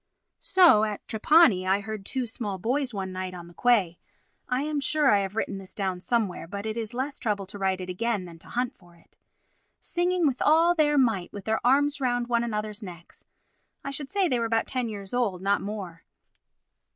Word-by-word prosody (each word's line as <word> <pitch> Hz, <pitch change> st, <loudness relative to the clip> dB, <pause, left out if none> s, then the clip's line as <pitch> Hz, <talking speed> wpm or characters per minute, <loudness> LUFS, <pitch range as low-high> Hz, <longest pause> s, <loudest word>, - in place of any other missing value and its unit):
So 350 Hz, -, +6 dB
at 210 Hz, -2 st, -3 dB
Trapani, 220 Hz, -, +4 dB
I 195 Hz, +2 st, +2 dB
heard 215 Hz, -1 st, -6 dB
two 260 Hz, -2 st, -1 dB
small 215 Hz, -4 st, -4 dB
boys 255 Hz, +7 st, -1 dB
one 195 Hz, -3 st, -4 dB
night 185 Hz, 0 st, -5 dB
on 175 Hz, -1 st, -9 dB
the 175 Hz, -, -15 dB
quay 190 Hz, -4 st, +2 dB, 0.5 s
(I 255 Hz, +2 st, 0 dB
am 300 Hz, -1 st, -1 dB
sure 290 Hz, 0 st, +3 dB
I 205 Hz, -, +4 dB
have 195 Hz, +1 st, -3 dB
written 200 Hz, -3 st, -2 dB
this 190 Hz, 0 st, -13 dB
down 190 Hz, -3 st, -2 dB
somewhere, 215 Hz, -7 st, -1 dB
but 200 Hz, +4 st, -6 dB
it 220 Hz, 0 st, -3 dB
is 230 Hz, 0 st, -5 dB
less 270 Hz, +3 st, -3 dB
trouble 205 Hz, -4 st, -1 dB
to 200 Hz, +2 st, -9 dB
write 190 Hz, -1 st, 0 dB
it 185 Hz, -, -6 dB
again 205 Hz, +1 st, -2 dB
than 170 Hz, -1 st, -12 dB
to -, -, -17 dB
hunt 245 Hz, +1 st, -2 dB
for 175 Hz, -2 st, -21 dB
it) 170 Hz, -, -26 dB, 0.6 s
singing 355 Hz, 0 st, 0 dB
with 265 Hz, -4 st, 0 dB
all 330 Hz, +3 st, +5 dB
their 300 Hz, -3 st, +2 dB
might, 225 Hz, -9 st, +1 dB
with 200 Hz, -2 st, -9 dB
their 220 Hz, 0 st, -1 dB
arms 285 Hz, +3 st, +3 dB
round 245 Hz, -2 st, +1 dB
one 235 Hz, -1 st, +2 dB
another's 210 Hz, -1 st, -4 dB
necks. 175 Hz, -4 st, -11 dB, 0.6 s
I 275 Hz, -, -4 dB
should 275 Hz, 0 st, -3 dB
say 395 Hz, -2 st, +1 dB
they 250 Hz, -6 st, +1 dB
were 230 Hz, -, 0 dB
about 225 Hz, 0 st, +1 dB
ten 250 Hz, -3 st, -2 dB
years 200 Hz, -1 st, -7 dB
old, 230 Hz, -7 st, 0 dB
not 200 Hz, +2 st, +1 dB
more. 195 Hz, -5 st, -6 dB
220 Hz, 210 wpm, -26 LUFS, 195-260 Hz, 0.6 s, So